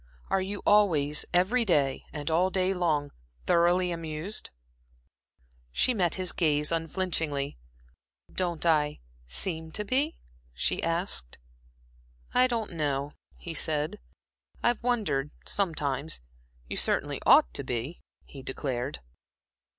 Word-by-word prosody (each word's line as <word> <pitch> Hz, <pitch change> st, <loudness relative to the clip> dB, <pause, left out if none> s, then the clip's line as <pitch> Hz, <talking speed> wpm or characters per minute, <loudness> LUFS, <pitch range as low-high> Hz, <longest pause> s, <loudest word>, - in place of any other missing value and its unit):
Are 195 Hz, -, +3 dB
you 200 Hz, +2 st, -4 dB
always, 160 Hz, -9 st, +4 dB
every 190 Hz, +8 st, +3 dB
day 145 Hz, -10 st, +2 dB
and 150 Hz, +1 st, -3 dB
all 175 Hz, +4 st, +3 dB
day 190 Hz, 0 st, +2 dB
long, 155 Hz, -6 st, 0 dB, 0.3 s
thoroughly 175 Hz, -, +3 dB
amused?" 165 Hz, +4 st, -4 dB, 1.2 s
She 250 Hz, -, +2 dB
met 180 Hz, -7 st, +1 dB
his 185 Hz, -2 st, +1 dB
gaze 150 Hz, -3 st, +2 dB
unflinchingly. 160 Hz, -, -1 dB, 0.7 s
"Don't 175 Hz, -3 st, -2 dB
I 150 Hz, -3 st, +3 dB, 0.3 s
seem 160 Hz, -, -4 dB
to 210 Hz, -, -2 dB
be?" 275 Hz, +8 st, +1 dB, 0.4 s
she -, -, +1 dB
asked. 165 Hz, -, 0 dB, 1.0 s
"I 255 Hz, 0 st, +6 dB
don't 230 Hz, -4 st, -2 dB
know," 145 Hz, -3 st, -1 dB, 0.2 s
he 170 Hz, -, -7 dB
said. 155 Hz, +5 st, 0 dB, 0.6 s
"I've 240 Hz, -2 st, +2 dB
wondered 215 Hz, -, 0 dB, 0.2 s
sometimes. 155 Hz, -6 st, -1 dB, 0.5 s
You -, -, -4 dB
certainly -, -, 0 dB
ought -, -, +7 dB
to -, -, -2 dB
be," 125 Hz, +8 st, -3 dB, 0.2 s
he 135 Hz, -, -10 dB
declared. 130 Hz, 0 st, -3 dB
165 Hz, 115 wpm, -28 LUFS, 145-190 Hz, 1.2 s, ought